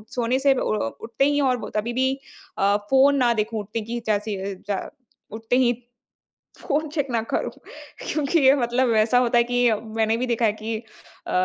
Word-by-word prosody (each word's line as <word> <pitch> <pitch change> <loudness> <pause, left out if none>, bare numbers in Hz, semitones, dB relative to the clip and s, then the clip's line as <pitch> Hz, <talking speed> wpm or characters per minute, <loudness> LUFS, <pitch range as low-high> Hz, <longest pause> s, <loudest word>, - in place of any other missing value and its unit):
सोने 245 +2 +1
से 275 0 +4
उ 255 - -1
अ, - - -1
उठते 230 +4 0
ही 290 0 +2
और 250 -2 -3
कभी 220 +3 -1
भी 260 +2 +1 0.5
अ, 200 +1 +3
फ़ोन 270 +1 +5
ना 245 -2 +3
देखूँ। 220 0 -2
उठने 215 +2 -4
की 235 +2 -4
जैसे 215 0 0
ही 200 -1 -4
जा 200 -2 -3 0.4
उठते 225 +2 -1
ही 245 -2 +3 0.9
फ़ोन 310 -1 -1
चेक 290 -2 -2
ना 230 -1 +1
करूँ। - - -1 0.6
क्योंकि 305 +2 +1
ये 270 -1 +6
मतलब 250 0 +1
वैसा 225 +2 +3
होता 240 -1 +3
है 235 - +5
कि 245 0 +2
मैंने 220 +1 -1
भी 250 - -1
देखा 235 -1 +1
है 210 - +2
कि 220 +1 -4 0.5
अ, - - -4
235 Hz, 195 wpm, -23 LUFS, 220-260 Hz, 0.9 s, ये